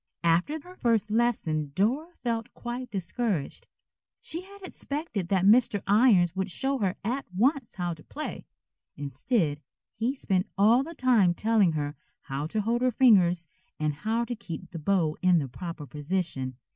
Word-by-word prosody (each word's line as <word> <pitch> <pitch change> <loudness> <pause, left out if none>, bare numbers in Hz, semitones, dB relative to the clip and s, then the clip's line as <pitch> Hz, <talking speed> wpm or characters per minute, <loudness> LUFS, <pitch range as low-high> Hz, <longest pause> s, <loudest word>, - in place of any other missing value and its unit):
After 175 - +2
her 360 +4 -14
first 225 - +1
lesson 165 -11 0
Dora 280 - 0
felt 230 -1 -2
quite 245 +1 -5
discouraged. 190 - -3 0.5
She 335 - -5
had 395 +1 -14
expected 285 - -4
that 190 -1 +2
Mr. 210 -2 +4
Irons 200 -5 +4
would 190 +1 -1
show 270 +8 -1
her 195 -3 0
at 250 +6 -2
once 255 - +1
how 175 -2 -2
to 155 -1 -13
play. 305 +1 -6 0.5
Instead, 145 - -1 0.4
he 245 +5 0
spent 190 -7 0
all 220 +6 +5
the 330 +4 -7
time 220 -9 +3
telling 215 -5 +3
her 145 -1 -2 0.3
how 140 +2 -4
to 215 +6 -1
hold 230 +3 0
her 255 - +3
fingers 185 -9 +4 0.3
and 150 -1 0
how 220 +9 -1
to 245 - -3
keep 185 -4 -8
the 165 - -6
bow 160 -2 +1
in 180 -1 +5
the 145 -4 0
proper 165 +3 -7
position. 145 -4 -3
200 Hz, 160 wpm, -28 LUFS, 170-245 Hz, 0.5 s, all